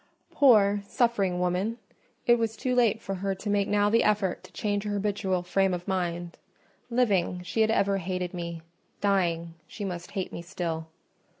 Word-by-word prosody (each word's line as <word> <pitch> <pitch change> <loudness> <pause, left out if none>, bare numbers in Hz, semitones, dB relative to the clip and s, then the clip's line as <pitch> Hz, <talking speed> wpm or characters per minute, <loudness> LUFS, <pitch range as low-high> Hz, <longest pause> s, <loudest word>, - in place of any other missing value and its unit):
Poor, 205 -7 +5
suffering 205 -8 +1
woman! 180 +6 0 0.5
it 240 0 +5
was 225 -1 -1
too 250 +3 -1
late 235 -3 +3
for 195 - -5
her 195 +1 -2
to 205 +2 -5
make 200 -1 +2
now 205 0 +3
the 230 +2 +4
effort 205 -4 +1
to - - -14
change 205 -1 -1
her 210 -1 -2
habitual 200 -3 -1
frame 190 +1 +1
of 175 0 -8
mind: 175 -2 -2 0.5
living, 200 -7 +1
she 180 +6 -1
had 220 - +4
ever 200 -3 +2
hated 180 0 -3
me—dying, 170 0 -2
she 205 - -6
must 175 -2 -5
hate 190 -3 -3
me - - -5
still. 170 -2 -4
195 Hz, 170 wpm, -27 LUFS, 180-210 Hz, 0.5 s, Poor